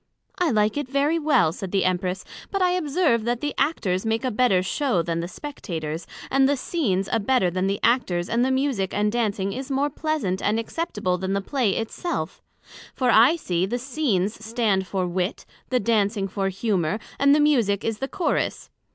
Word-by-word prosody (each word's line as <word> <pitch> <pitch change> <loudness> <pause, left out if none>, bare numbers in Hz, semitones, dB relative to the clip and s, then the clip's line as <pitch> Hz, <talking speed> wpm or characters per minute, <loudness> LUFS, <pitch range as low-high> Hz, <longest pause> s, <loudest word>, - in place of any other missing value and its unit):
I 355 -2 +3
like 215 0 +2
it 290 -3 -3
very 285 +4 +1
well, 285 - +3
said 190 0 -6
the 195 -2 +1
Empress; 185 0 -1 0.2
but 390 - -1
I 365 -1 +3
observe 305 -8 +1
that 240 0 0
the 295 +2 -2
Actors 190 - 0
make 225 +3 -1
a 255 - 0
better 210 -5 +3
show 190 - 0
than 165 0 -2
the 170 - -3
Spectators; 165 - -6 0.2
and 270 0 +4
the 285 - +2
Scenes 205 - -1
a 225 - +2
better 205 -4 +2
than 185 +2 0
the 200 +1 -1
Actors 185 -8 +2
and 235 +3 +1
the 260 - +2
Musick 260 -8 0
and 210 0 +1
Dancing 205 -4 -1
is 265 +2 -6
more 280 +2 0
pleasant 290 - -1
and 215 +2 +1
acceptable 215 - -2
than 190 +1 -2
the 200 - +1
Play 225 0 0
it 225 - -3
self; 350 - -4 0.5
for 250 -2 +2
I 240 +9 +6
see, 185 - -1
the 240 +5 -1
Scenes 235 -7 -1
stand 220 -4 0
for 185 +1 -1
Wit, 180 +4 -2 0.2
the 255 - +2
Dancing 205 -2 +1
for 195 0 -1
Humour, 195 -2 0 0.2
and 280 +1 +5
the - - +3
Musick 240 -10 +2
is 225 -1 -2
the 270 - -2
Chorus. 365 +4 -2
220 Hz, 195 wpm, -24 LUFS, 190-275 Hz, 0.5 s, I